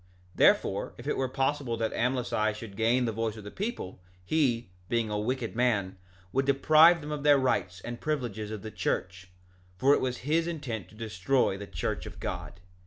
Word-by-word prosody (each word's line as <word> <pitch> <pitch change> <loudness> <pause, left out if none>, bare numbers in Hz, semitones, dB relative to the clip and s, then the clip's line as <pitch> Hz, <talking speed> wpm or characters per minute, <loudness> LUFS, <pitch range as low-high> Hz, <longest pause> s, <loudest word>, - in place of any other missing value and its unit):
2:4 - - -22
Therefore, - - +3
if - - -10
it - - 0
were 135 - 0
possible 135 -2 -1
that 110 -1 -1
Amlici 120 -3 0
should 110 -2 -9
gain 120 +4 +2
the 115 - 0
voice 110 0 -2
of 105 - -9
the 105 - -8
people, 190 - -5 0.2
he, 120 - +1 0.2
being 115 -2 0
a 105 - -1
wicked 120 +1 -2
man, 110 -6 +1 0.4
would 135 +1 +1
deprive 155 +5 +6
them 150 +1 -6
of 150 -1 -3
their 145 0 +6
rights 95 -9 0
and 120 0 -7
privileges 120 -9 -2
of 110 -2 -6
the 110 - -6
church; 90 -2 -3 0.5
for 135 +7 +5
it - - +2
was 125 -1 -1
his 165 +3 +2
intent 120 - -4
to - - -17
destroy 110 +2 0
the 100 +1 -7
church - - -3
of - - -10
God. 85 - -5
120 Hz, 195 wpm, -29 LUFS, 105-135 Hz, 0.5 s, deprive